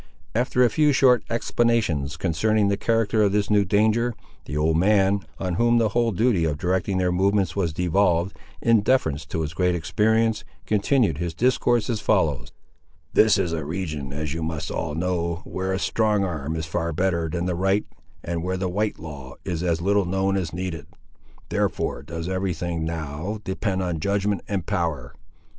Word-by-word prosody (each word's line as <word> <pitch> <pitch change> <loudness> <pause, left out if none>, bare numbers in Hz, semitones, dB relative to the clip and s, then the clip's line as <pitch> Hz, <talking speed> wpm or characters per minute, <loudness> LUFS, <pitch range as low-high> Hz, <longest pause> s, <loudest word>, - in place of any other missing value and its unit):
After 125 +2 +2
a 120 - +5
few 150 +4 +3
short 130 -2 +4
explanations 115 -12 0
concerning 100 +6 +1
the 100 - +2
character 115 0 +1
of 100 -2 +3
this 105 0 +1
new 105 -1 +5
danger, 110 +4 +2 0.3
the 70 - -4
old 80 +1 +2
man, 100 +1 +3 0.2
on 90 -2 -2
whom 120 0 +4
the 115 -2 +3
whole 115 +2 +1
duty 110 -3 +2
of 75 -3 0
directing 95 +3 0
their 90 -1 +1
movements 95 -1 +1
was 90 -5 0
devolved, 90 +1 +1 0.3
in 115 -2 +4
deference 80 - +1
to 80 - -3
his 75 0 -3
great 90 +1 +1
experience, 110 +6 +1 0.2
continued 105 - +2
his 85 -2 -3
discourse 120 -2 +2
as 115 -4 -2
follows— 80 - +1 0.6
"This 110 -1 +5
is 90 -4 0
a 80 -2 -2
region, 75 -4 -4
as 75 +1 -3
you 85 - -4
must 80 -1 -3
all 75 - -3
know, 85 0 -1
where 95 +1 -3
a 95 - 0
strong 105 0 +1
arm 80 -4 -3
is 80 -1 -3
far 85 +1 -2
better 85 -1 0
than 85 +1 -2
the 90 - 0
right, 95 +4 +1 0.4
and 85 -1 -3
where 95 +2 -2
the 95 0 -1
white 105 +3 -1
law 70 -4 -9
is 85 -4 -2
as 85 -2 0
little 100 0 +2
known 95 +2 0
as 90 -5 -2
needed. 85 -4 -5 0.6
Therefore - - -1
does 80 +3 -6
every 95 -1 -1
thing, 85 -1 -3
now, 80 +5 -4
depend 95 0 -2
on 85 -3 -2
judgment 100 +3 0
and 95 -5 -2
power. 75 -9 -2
95 Hz, 180 wpm, -24 LUFS, 80-105 Hz, 0.6 s, a